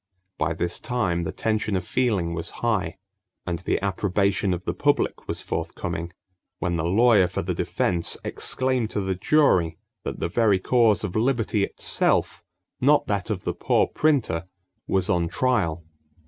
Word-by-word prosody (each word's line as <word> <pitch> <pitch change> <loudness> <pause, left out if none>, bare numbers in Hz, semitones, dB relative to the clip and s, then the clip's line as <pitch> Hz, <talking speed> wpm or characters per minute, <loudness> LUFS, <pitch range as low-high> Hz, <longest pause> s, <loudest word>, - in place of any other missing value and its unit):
By 85 +1 0
this 85 +1 -2
time 95 -9 -1
the - - -2
tension 110 -2 -1
of 90 -2 -2
feeling 100 -10 0
was 85 0 -3 0.2
high, 95 -6 0 0.5
and 85 -2 -2
the 90 - -1
approbation 100 0 +1
of 90 0 -3
the - - -1
public - - 0
was - - -3
forthcoming 85 +1 -4 0.5
when 90 -2 -1
the 80 -1 -1
lawyer 105 +1 +5
for 90 - -3
the 90 +1 -2
defense 85 0 -1
exclaimed 130 -3 0
to 105 - -2
the 95 0 -1
jury 90 - +2 0.3
that - - -5
the - - -1
very 105 +2 +3
cause 110 +1 +3
of 100 -4 -4
liberty 115 -3 +1
itself, - - 0 0.4
not 145 +3 +4
that 100 +1 -2
of 100 -4 -2
the - - -1
poor - - +2
printer, 125 - 0 0.4
was 95 -1 +1
on 85 -4 +1
trial! 85 -8 0
95 Hz, 160 wpm, -24 LUFS, 85-115 Hz, 0.5 s, lawyer